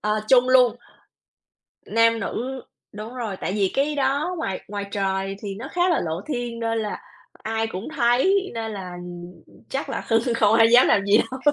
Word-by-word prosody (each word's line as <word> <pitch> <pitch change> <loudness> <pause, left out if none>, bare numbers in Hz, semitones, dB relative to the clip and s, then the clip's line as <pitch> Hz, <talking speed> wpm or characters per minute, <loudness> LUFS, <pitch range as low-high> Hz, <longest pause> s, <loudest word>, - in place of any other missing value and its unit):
Ờ, 210 0 0
chung 255 -1 +5
luôn. 250 -3 +5 1.1
Nam 230 0 +3
nữ 260 +3 -4 0.3
đúng 215 +4 -8
rồi, 225 -6 -4
tại 190 - -3
vì 195 -3 +1
cái 290 +2 0
đó 285 +6 0
ngoài 195 - -3
ngoài 200 0 -5
trời 195 -1 -1
thì 200 -2 -5
nó 225 - -7
khá 355 +1 +2
là 340 - +2
lộ 165 +2 -3
thiên 240 -4 -4
nên 225 0 -1
là 210 -1 -3 0.5
ai 225 0 -1
cũng 190 0 -6
thấy 375 +12 +2
nên 225 -1 -4
là 185 -3 -7 0.8
chắc 275 +1 -3
là - - -4
hưng 230 +1 +2
không 215 -1 +3
ai 225 0 +6
dám 245 +1 +7
làm 200 0 +3
gì 205 +2 +5
đâu. 255 +3 -2
230 Hz, 185 wpm, -23 LUFS, 205-255 Hz, 1.1 s, dám